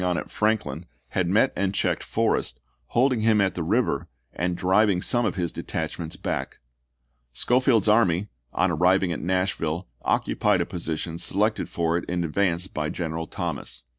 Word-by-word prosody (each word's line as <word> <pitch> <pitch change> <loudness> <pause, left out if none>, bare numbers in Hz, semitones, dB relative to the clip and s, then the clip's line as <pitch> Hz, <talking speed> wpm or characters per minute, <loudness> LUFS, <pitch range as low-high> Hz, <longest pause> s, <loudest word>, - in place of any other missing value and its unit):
on 90 -1 +1
at - - -5
Franklin, 90 -8 0 0.2
had 95 -2 0
met 110 +9 +3
and 100 0 -1
checked - - 0
Forrest, 65 - 0 0.3
holding 130 0 +2
him 110 -1 +3
at 95 -2 +2
the 90 - -4
river 90 - +1 0.3
and 90 +1 -1
driving 95 +1 +3
some 120 +5 +2
of - - -2
his 85 -3 -1
detachments 85 +1 -4
back. - - -3 0.8
Schofield's 125 - +2
army, 105 -3 +3 0.2
on 95 - +1
arriving 90 +2 +3
at - - -4
Nashville, 90 -2 -1
occupied - - +1
a - - +1
position 85 -1 -4
selected 105 +5 0
for 85 0 0
it - - -10
in 90 0 0
advance 85 +1 0
by 75 -5 -3
General 80 -1 -3
Thomas. - - -4
90 Hz, 160 wpm, -25 LUFS, 85-105 Hz, 0.8 s, met